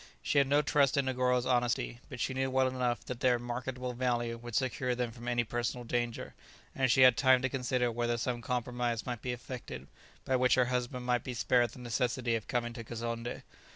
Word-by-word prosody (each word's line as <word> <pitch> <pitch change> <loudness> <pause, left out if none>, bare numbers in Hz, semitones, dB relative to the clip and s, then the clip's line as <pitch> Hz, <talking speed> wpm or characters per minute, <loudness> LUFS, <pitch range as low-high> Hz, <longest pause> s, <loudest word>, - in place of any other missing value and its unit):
She 145 - +3
had 140 - +3
no 145 +2 +3
trust 140 -1 +3
in 140 - +2
Negoro's 125 -1 +1
honesty, 120 - 0
but - - -8
she - - -1
knew 135 0 0
well 130 0 +3
enough 125 -2 -1
that 125 -2 -5
their 125 -1 +3
"marketable 125 +1 -4
value" 120 -1 -1
would 120 -1 -7
secure 125 -1 0
them 120 -1 -2
from 120 +1 -10
any 120 -1 +2
personal 120 +2 -3
danger, 120 0 -2 0.4
and 130 -2 +2
she 130 - +4
had 130 -2 +8
time 130 +1 +4
to 130 - +1
consider 125 -2 0
whether 120 0 -1
some 120 0 -2
compromise 120 -1 -2
might 120 -3 -4
be 125 - -2
effected 120 - -7 0.4
by 130 - +2
which 125 -1 +4
her 125 - +4
husband 125 0 -2
might 125 -1 +1
be 125 - -5
spared 120 0 +3
the - - -13
necessity 120 0 -1
of 115 -2 -2
coming 120 -1 -1
to 115 - -7
Kazonndé. 115 +1 -5
125 Hz, 210 wpm, -31 LUFS, 120-130 Hz, 0.4 s, had